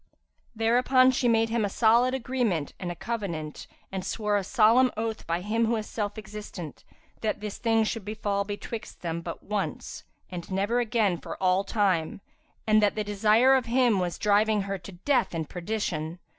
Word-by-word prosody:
'''[FN#347] -, -, -41 dB, 0.5 s
Thereupon 250 Hz, +3 st, +4 dB
she 255 Hz, -1 st, 0 dB
made 225 Hz, -1 st, +3 dB
him 230 Hz, -1 st, 0 dB
an 230 Hz, +5 st, +3 dB
agreement 240 Hz, -, -1 dB
and 180 Hz, -2 st, -3 dB
a -, -, -6 dB
covenant 170 Hz, -9 st, -5 dB, 0.2 s
and 190 Hz, -1 st, -4 dB
swore 210 Hz, +1 st, -1 dB
a 200 Hz, -, +1 dB
solemn 235 Hz, +4 st, +4 dB
oath 225 Hz, 0 st, -3 dB
by 170 Hz, +1 st, -1 dB
Him 225 Hz, +4 st, 0 dB
who 230 Hz, -, +1 dB
is 215 Hz, -1 st, -3 dB
Self 205 Hz, -1 st, -3 dB
existent, 210 Hz, -7 st, -8 dB, 0.4 s
that 220 Hz, -, -1 dB
this 210 Hz, -1 st, -6 dB
thing 225 Hz, -1 st, +2 dB
should 220 Hz, 0 st, -3 dB
befal 205 Hz, -1 st, -2 dB
betwixt 210 Hz, +2 st, -7 dB
them 170 Hz, 0 st, -3 dB
but 170 Hz, 0 st, -7 dB
once 210 Hz, -1 st, -4 dB, 0.3 s
and 175 Hz, -2 st, -6 dB
never 200 Hz, +6 st, +1 dB
again 220 Hz, -7 st, +1 dB
for -, -, -7 dB
all 185 Hz, +1 st, +2 dB
time, 195 Hz, -7 st, 0 dB, 0.5 s
and 215 Hz, 0 st, +4 dB
that 205 Hz, -1 st, +2 dB
the 215 Hz, -, -1 dB
desire 215 Hz, +5 st, +4 dB
of 260 Hz, -2 st, +2 dB
him 240 Hz, -4 st, +3 dB
was 175 Hz, -1 st, -2 dB
driving 210 Hz, 0 st, +2 dB
her 195 Hz, 0 st, -4 dB
to 180 Hz, +4 st, -11 dB
death 230 Hz, +1 st, 0 dB
and 160 Hz, -2 st, -3 dB
perdition. 175 Hz, -4 st, -3 dB
210 Hz, 180 wpm, -27 LUFS, 190-230 Hz, 0.5 s, Thereupon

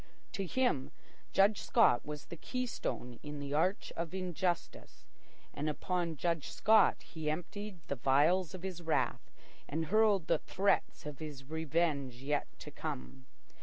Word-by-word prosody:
To 195 Hz, -2 st, -3 dB
him, 245 Hz, -, +1 dB, 0.4 s
Judge 200 Hz, +2 st, +4 dB
Scott 225 Hz, -, +4 dB
was 150 Hz, 0 st, -6 dB
the 170 Hz, -, -8 dB
keystone 230 Hz, -, -4 dB
in 150 Hz, 0 st, -6 dB
the 140 Hz, 0 st, -4 dB
arch 180 Hz, +7 st, +1 dB
of 170 Hz, +2 st, -3 dB
injustice, 180 Hz, -1 st, -3 dB, 0.5 s
and 150 Hz, +2 st, -1 dB
upon 170 Hz, +1 st, -1 dB
Judge 165 Hz, -1 st, -1 dB
Scott 215 Hz, +6 st, +4 dB
he 160 Hz, -2 st, -4 dB
emptied 195 Hz, +5 st, -4 dB
the 140 Hz, -, -2 dB
vials 150 Hz, +8 st, +3 dB
of 185 Hz, -, -9 dB
his 185 Hz, -3 st, -4 dB
wrath 165 Hz, -1 st, 0 dB, 0.4 s
and 160 Hz, +3 st, -1 dB
hurled 215 Hz, -5 st, +5 dB
the -, -, +2 dB
threats 195 Hz, -4 st, 0 dB
of 150 Hz, -2 st, -6 dB
his 150 Hz, -4 st, -7 dB
revenge 155 Hz, -3 st, 0 dB
yet 145 Hz, +1 st, 0 dB
to -, -, -8 dB
come. 65 Hz, +1 st, -6 dB
165 Hz, 145 wpm, -34 LUFS, 145-185 Hz, 0.5 s, hurled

